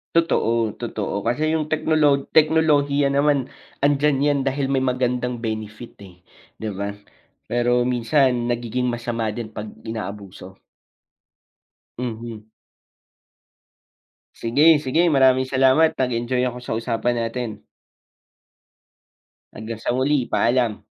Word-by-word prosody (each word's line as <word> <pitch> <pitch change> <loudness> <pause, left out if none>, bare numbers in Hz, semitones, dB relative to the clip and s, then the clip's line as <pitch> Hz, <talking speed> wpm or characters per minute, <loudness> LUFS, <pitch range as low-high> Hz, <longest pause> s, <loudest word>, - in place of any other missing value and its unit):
Totoo, 115 -9 +2
totoo. 105 -3 -4
Kasi 150 +6 0
yung 155 - -3
teknolo 155 -3 +2
teknolohiya 145 -3 +3
naman 140 -2 +1 0.3
andiyan 145 -1 +2
yan 145 -1 +2
dahil 135 0 -1
may 135 - +2
magandang 125 -2 -1
benefit, 110 +1 -6
eh, 90 -2 -15 0.3
di 110 -1 -5
ba? 100 +1 -4 0.6
Pero 120 +1 +2
minsan 125 0 +1
nagiging 120 +1 -2
masama 120 -1 -2
din 115 -2 -6
pag 105 0 -6 0.2
inaabuso. 100 -4 -7 1.4
Mhm. 115 -3 -6 1.9
Sige, 120 +6 0 0.2
sige 130 +6 +1
maraming 130 -1 +4
salamat 135 +4 +3
nag-enjoy 125 0 -1
ako 125 -1 -2
sa 125 - -4
usapan 120 +1 -1
natin. 115 -2 -4 1.9
Hanggang 110 0 -7
sa - - -3
muli, 130 0 +1
paalam. 115 -4 +1
125 Hz, 105 wpm, -22 LUFS, 115-140 Hz, 1.9 s, maraming